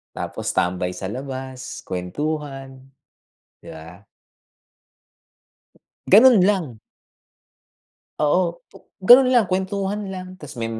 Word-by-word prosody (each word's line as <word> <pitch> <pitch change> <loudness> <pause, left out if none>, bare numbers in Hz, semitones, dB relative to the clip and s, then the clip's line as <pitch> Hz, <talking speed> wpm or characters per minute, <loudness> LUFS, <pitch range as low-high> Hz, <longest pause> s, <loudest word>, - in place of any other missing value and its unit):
Tapos - - -4
tambay 90 0 -1
sa 95 - -6
labas, 130 0 -7
kuwentuhan, 135 - -5 0.8
'di - - -16
ba? 80 +5 -13 2.0
Ganun 225 +1 +7
lang. 180 - -1 1.4
Oo 170 +3 0
pu - - -16 0.3
ganun 255 +4 +8
lang, 245 -4 +4
kuwentuhan 195 +2 -3
lang 185 -1 -7
tas 145 -3 -10
me 115 - -3
150 Hz, 95 wpm, -21 LUFS, 130-190 Hz, 2.0 s, ganun